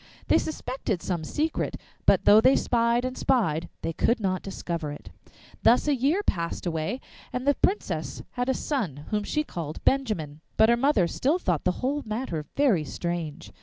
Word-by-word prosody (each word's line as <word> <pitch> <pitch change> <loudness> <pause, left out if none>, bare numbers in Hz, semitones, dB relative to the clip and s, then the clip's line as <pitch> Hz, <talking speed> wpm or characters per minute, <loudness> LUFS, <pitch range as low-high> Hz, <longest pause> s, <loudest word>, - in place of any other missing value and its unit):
They - - +6
suspected 255 - -3
some 175 -4 -2
secret, 305 - -1 0.3
but - - +5
though 210 +1 +8
they 260 +3 +6
spied 235 +1 +2
and 255 0 -3
spied, 170 - +1
they 165 - -1
could 235 +9 +2
not 185 -3 -1
discover 170 -5 -4
it. 145 - -10 0.5
Thus 245 +5 +4
a 295 - +4
year 285 +10 +1
passed 170 - -2
away, 165 +7 -2 0.3
and 250 +1 -3
the 285 - +5
Princess 390 +8 -1
had 250 +1 -2
a 265 - +2
son, 175 - -3
whom 210 -1 0
she 300 +8 0
called 165 - -6
Benjamin. 190 - 0 0.2
But 220 +1 +6
her 235 - +6
mother 240 -6 +3
still 275 - +1
thought 180 - -1
the 180 - +4
whole 290 +3 0
matter 215 - -3
very 245 - +3
strange. 170 0 -4
220 Hz, 175 wpm, -26 LUFS, 170-265 Hz, 0.5 s, though